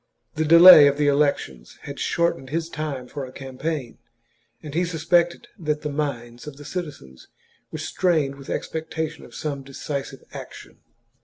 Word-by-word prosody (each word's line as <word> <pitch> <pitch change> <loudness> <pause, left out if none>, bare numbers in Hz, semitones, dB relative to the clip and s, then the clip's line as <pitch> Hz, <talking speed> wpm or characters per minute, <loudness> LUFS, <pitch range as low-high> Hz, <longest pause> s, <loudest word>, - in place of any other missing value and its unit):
The 155 - -1
delay 170 -1 +10
of 140 0 +1
the 150 - +1
elections 140 - 0
had - - -8
shortened 170 -6 0
his 165 +3 -2
time 150 -6 -5
for 140 +2 -6
a 130 - -8
campaign, 135 0 -5 0.6
and 150 - -8
he 175 +3 +1
suspected 170 +1 +1
that 150 -2 -2
the 150 - -3
minds 125 -4 -4
of 145 -2 -8
the 145 - -12
citizens 145 - -7 0.4
were - - -5
strained 160 -7 0
with 140 -1 -12
expectation 160 0 -4
of - - -15
some 140 -3 -4
deci 140 +1 -5
sive - - -13
action. - - -10
150 Hz, 160 wpm, -23 LUFS, 135-160 Hz, 0.6 s, delay